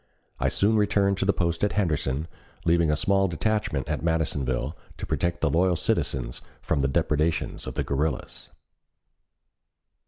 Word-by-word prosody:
I - - +2
soon 110 +2 +3
returned 100 -2 +2
to - - +1
the 100 - +4
post 85 -2 -1
at 105 - +2
Henderson, 75 -6 0 0.4
leaving 85 -1 +3
a 75 - +3
small 95 +5 +2
detachment 90 -5 -1
at 75 0 -2
Madisonville 75 -4 -1 0.2
to - - -5
protect 85 -1 -1
the - - +3
loyal 90 +2 +3
citizens 60 -6 -1 0.2
from 80 - -1
the 70 - +2
depredations 80 +2 0
of - - -5
the - - 0
guerrillas. 75 +3 -2
80 Hz, 150 wpm, -26 LUFS, 75-95 Hz, 0.4 s, the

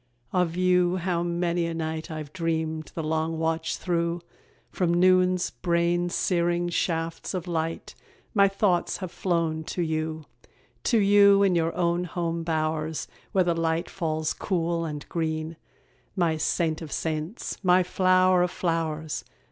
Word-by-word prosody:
Of 180 -2 +1
you, 180 0 +3
how 175 -1 -1
many 170 0 0
a 165 - -3
night 160 0 -3
I've 155 -2 -6
dreamed, 160 -2 -2
the 165 - -3
long 160 +1 -1
watch 160 0 -1
through! 170 -1 -1 0.5
From 180 -2 0
noon's 185 0 +3
brain 170 +5 +1
searing 175 -1 +1
shafts 165 +1 -2
of 180 -1 -4
light 165 -1 -3 0.4
My 200 -3 +5
thoughts 195 -2 +1
have 185 -3 -6
flown 165 -3 -1
to 175 - -2
you. 160 -1 -2 0.6
To 235 - +3
you 200 -1 +6
in 195 -2 +3
your 165 -1 +1
own 175 0 +1
home 170 0 -2
bowers, 155 -1 -1 0.2
Where 190 - +3
the 175 -1 +1
light 165 0 -1
falls 155 -3 -1
cool 170 -3 -1
and 150 -2 -6
green, 160 -1 -2 0.6
My 170 -4 +2
saint 160 0 0
of 155 -3 -7
saints! 160 +5 -3
my 180 0 +5
flower 185 0 +3
of 180 - +2
flowers! 160 -3 -2
170 Hz, 145 wpm, -26 LUFS, 160-180 Hz, 0.6 s, you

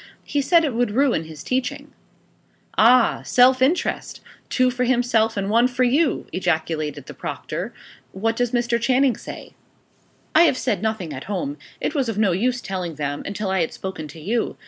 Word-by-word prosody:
He 290 - -1
said 330 +3 +4
it 280 - -1
would 240 0 +1
ruin 255 - +2
his 155 -2 -10
teaching." 255 0 -3 0.8
"Ah! 240 +2 +5
self 255 +1 +4
interest 300 +8 0 0.3
two 255 -1 +2
for 250 0 -1
himself 235 -3 +2
and 195 -1 -1
one 230 +4 +4
for 255 0 0
you!" 275 +4 +2
ejaculated 160 -4 -1
the - - -9
proctor. - - -5 0.4
"What 225 +7 -1
does 245 0 0
Mr. 240 -1 0
Channing 260 0 +3
say?" - - -10 0.8
"I 330 +2 +7
have 280 -6 +2
said 200 -7 -1
nothing 215 -8 -2
at 130 - -7
home. 280 +8 -3 0.2
It - - -2
was 270 -6 0
of 220 - -3
no 210 -3 +3
use 245 +7 0
telling 180 -4 -4
them, 145 -1 -3
until 200 -1 -3
I 190 -2 +1
had 160 - -2
spoken 190 -5 -6
to 150 +3 -12
you. 220 +9 -2
230 Hz, 180 wpm, -22 LUFS, 190-255 Hz, 0.8 s, I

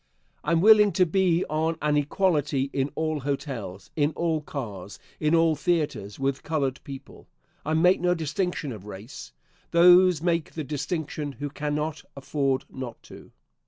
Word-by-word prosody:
I 150 - -1
am 165 -1 +3
willing 210 0 +7
to 185 - +4
be 180 0 +2
on 160 +1 -1
an 150 0 +1
equality 145 -3 +1
in 135 0 0
all 155 -1 -1
hotels, 135 -9 -5
in 150 0 +1
all 165 -2 0
cars, 105 -10 -7 0.2
in 155 +2 +2
all 165 -1 +4
theatres, 150 - -1
with 135 0 -1
colored 140 -4 -1
people. 135 -1 -11 0.4
I 155 +1 -1
make 180 +3 +4
no 180 0 +2
distinction 160 -1 -2
of 105 -3 -9
race. 105 +5 -9 0.4
Those 180 0 +6
make 170 -1 -1
the 155 - -4
distinction 150 0 -4
who 145 +1 -6
cannot 150 +1 -3 0.2
afford 140 -1 -1
not 130 -3 -7
to. - - -14
150 Hz, 155 wpm, -26 LUFS, 140-165 Hz, 0.4 s, willing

